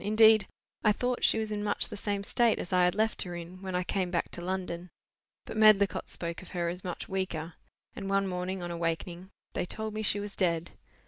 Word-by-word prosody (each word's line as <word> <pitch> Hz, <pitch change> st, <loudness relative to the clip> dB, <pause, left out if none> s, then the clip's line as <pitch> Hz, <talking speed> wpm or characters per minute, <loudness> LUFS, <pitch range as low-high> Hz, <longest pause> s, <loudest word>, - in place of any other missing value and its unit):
Indeed, 215 Hz, 0 st, +6 dB, 0.4 s
I 215 Hz, -, +5 dB
thought 245 Hz, +3 st, -1 dB
she -, -, +5 dB
was 220 Hz, -1 st, -2 dB
in 205 Hz, -1 st, -2 dB
much 205 Hz, -1 st, +1 dB
the -, -, -6 dB
same 200 Hz, -1 st, -2 dB
state 235 Hz, +2 st, +3 dB
as 180 Hz, -, -4 dB
I 180 Hz, -1 st, +5 dB
had 180 Hz, -, +2 dB
left 220 Hz, +1 st, +1 dB
her 175 Hz, -1 st, -4 dB
in, 175 Hz, +2 st, -8 dB
when 190 Hz, -1 st, -4 dB
I 180 Hz, -, +1 dB
came 185 Hz, 0 st, -1 dB
back 175 Hz, -1 st, -1 dB
to 175 Hz, -, -6 dB
London. 180 Hz, -1 st, -3 dB, 0.6 s
But -, -, -6 dB
Medlicott 215 Hz, -2 st, +5 dB
spoke 170 Hz, -1 st, -4 dB
of 185 Hz, -, -12 dB
her 170 Hz, -1 st, +1 dB
as 180 Hz, +2 st, -6 dB
much 180 Hz, -2 st, -5 dB
weaker; 175 Hz, -4 st, -3 dB, 0.4 s
and 195 Hz, -1 st, -5 dB
one 195 Hz, 0 st, +2 dB
morning 180 Hz, 0 st, -3 dB
on 175 Hz, -, -4 dB
awakening, 170 Hz, +2 st, -3 dB, 0.2 s
they -, -, -1 dB
told 220 Hz, +2 st, -4 dB
me 215 Hz, -, -2 dB
she 205 Hz, -1 st, +1 dB
was 205 Hz, 0 st, -4 dB
dead. 170 Hz, -3 st, +1 dB
190 Hz, 220 wpm, -30 LUFS, 175-210 Hz, 0.6 s, Indeed